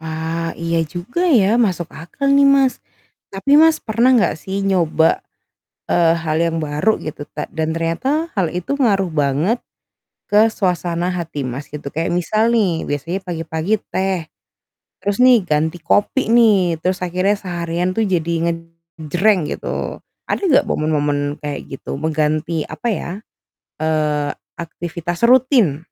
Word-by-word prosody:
Wah, 160 +1 -3
iya 165 -1 0
juga 180 - -3
ya, 230 - +4
masuk 185 -8 +1
akal 225 - -4
nih, 280 - +6
Mas. 275 -2 +3 0.5
Tapi 275 +10 +3
Mas, 320 0 +5
pernah 235 +4 +2
enggak 230 -9 +3
sih 195 +4 -4
nyoba, 170 -5 +2 0.6
eee, 165 -1 +3
hal 155 -1 -2
yang 165 -1 0
baru 155 +8 0
gitu 155 -1 -7
ta - - -5
dan 160 0 -1
ternyata 165 - -1
hal 185 -6 0
itu 180 +10 -3
ngaruh 205 -9 +2
banget 155 - 0 0.6
ke 215 +2 +4
suasana 180 -3 -1
hati 165 -6 -4
Mas, 130 +4 -6
gitu. 145 -1 -7
Kayak 165 +2 -1
misal 215 +6 +1
nih, 200 -8 +1
biasanya 160 +6 -2
pagi-pagi 165 +3 -2 0.2
teh 190 -1 0 0.8
terus 205 +3 -1
nih 250 -5 +6
ganti 160 0 0
kopi 220 +6 +1
nih, 195 -8 +4
terus 185 +1 -1
akhirnya 185 +4 +1
seharian 175 -1 -2
tuh 220 +1 0
jadi 170 -2 0 0.2
ngejreng 165 +2 -1
gitu. - - -4 0.3
Ada - - 0
nggak 275 - +4
momen-momen 145 -1 -1
kayak 145 -1 -3 0.2
gitu? 135 - -6
Mengganti, 155 +1 0
apa 240 - -4
ya, 195 -5 -2 0.7
eee, 150 -2 0 0.3
aktivitas 170 +2 -5
rutin. 240 - +4
175 Hz, 140 wpm, -19 LUFS, 160-210 Hz, 0.8 s, nih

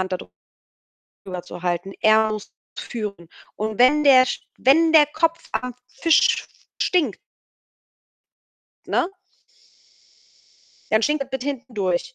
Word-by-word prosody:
Hand 185 0 -3
da - - +1 1.1
drüber 180 -2 -6
zu 180 0 -11
halten. 180 +2 -2
Er 220 0 +4
muss 215 -1 -6 0.3
führen. 200 -7 -6 0.3
Und 215 0 -4
wenn 280 +5 +5
der 260 -2 +7
Sch - - -3 0.2
wenn 320 +5 +4
der 300 -2 +7
Kopf 330 +2 -1
am 250 -1 -3
Fisch 330 +4 +2 0.3
stinkt 305 - +1 1.7
ne 355 - 0 1.8
dann 220 +1 +3
stinkt 295 +1 +1
es 265 - -24
bis 265 0 -4
hinten 260 -3 -5
durch. 180 -4 -2
245 Hz, 125 wpm, -22 LUFS, 200-290 Hz, 1.8 s, der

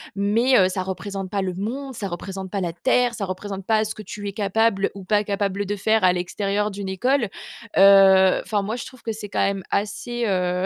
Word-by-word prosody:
Mais, 225 +6 +3
heu, 185 -2 +5
ça 185 0 -2
représente 190 0 -5
pas 200 -1 -1
le 185 -1 -2
monde, 255 +8 -4
ça 205 -3 -4
représente 190 +1 -6
pas 200 0 -3
la 170 -2 -2
terre, 245 +5 +1
ça 210 -4 -3
représente 190 +1 -6
pas 220 0 +2
ce 220 - -4
que - - -10
tu 205 +1 -7
es 200 - -4
capable 205 0 +1
ou 195 - -8
pas 210 +2 +2
capable 200 0 -2
de 205 +1 -2
faire 215 +1 +1
à 180 - +5
l'extérieur 200 +3 -1
d'une 195 -1 -5
école. 240 +4 +1 0.5
Heu, 195 -1 +7
enfin, 205 -2 -1
moi, 215 +3 -3
je 240 - -6
trouve 255 -2 -13
que 225 - -2
c'est 210 -2 -7
quand - - -2
même 195 -1 0
assez, 235 +4 -2
heu, 180 -1 0
200 Hz, 225 wpm, -23 LUFS, 190-215 Hz, 0.5 s, Heu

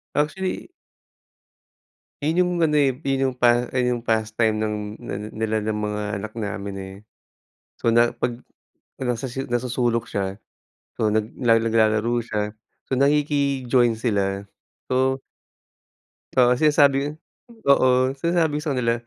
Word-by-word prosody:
Actually 185 +6 -1 1.5
yun 160 +4 +1
yung 180 0 +3
ano, 150 -2 +2
eh, 135 -3 +3
yun 135 -1 +1
yung - - -13
pa 120 0 +3
yung 125 -1 +1
pastime 110 -1 0
ng 110 0 -1 0.3
na - - -5 0.2
nila 110 0 0
ng 110 - 0
mga 105 0 -2 0.2
anak 110 0 -6
namin, 100 -1 -4
eh, 95 0 -8 0.9
so - - 0
na 120 +1 +4
pag 120 0 -2 0.6
nasa 125 -2 -2 0.2
nasa 120 +1 -1
sulok 120 -2 +1
siya, 95 -1 -3 0.6
so 110 - +2
nag 110 +1 -1
nag 115 -3 +3
naglalaro 115 +1 +2
siya, 105 -2 -3 0.3
so - - -1
nakiki-join 140 -4 +2
sila, 100 -4 -1 0.4
so 130 +1 +1 1.1
Oo 125 -1 +4
sinasabi 145 -1 +4
ko - - -2 0.6
oo 135 -2 +6 0.3
sinasabi 165 0 +1
ko - - -3
sa 150 - 0
kanila, 120 -2 +1
120 Hz, 130 wpm, -23 LUFS, 110-135 Hz, 1.5 s, oo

